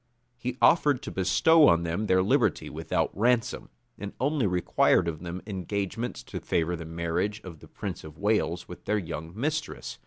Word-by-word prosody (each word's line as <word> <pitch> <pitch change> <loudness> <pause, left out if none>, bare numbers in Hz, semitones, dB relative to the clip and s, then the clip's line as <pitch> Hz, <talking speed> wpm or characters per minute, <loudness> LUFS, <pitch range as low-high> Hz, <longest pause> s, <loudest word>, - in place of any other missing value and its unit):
He 125 +1 -5
offered 145 -6 +4
to - - -5
bestow 145 - +5
on 85 0 +4
them 85 +6 -2
their 95 -1 +4
liberty - - +1
without - - -2
ransom; 120 +3 +1 0.3
and 100 -1 -6
only 140 -2 +1
required 90 -1 +2
of 80 -2 -3
them 90 +1 -6
engagements 100 - -4
to - - -6
favor 85 +1 0
the 85 -1 -7
marriage 85 +5 -2
of 85 -4 -10
the - - -14
prince 95 -4 -6
of 75 0 -11
Wales 90 -5 0
with 90 - -11
their 105 - +1
young 80 -4 -5
mistress. 150 +3 -3
95 Hz, 175 wpm, -27 LUFS, 85-120 Hz, 0.3 s, bestow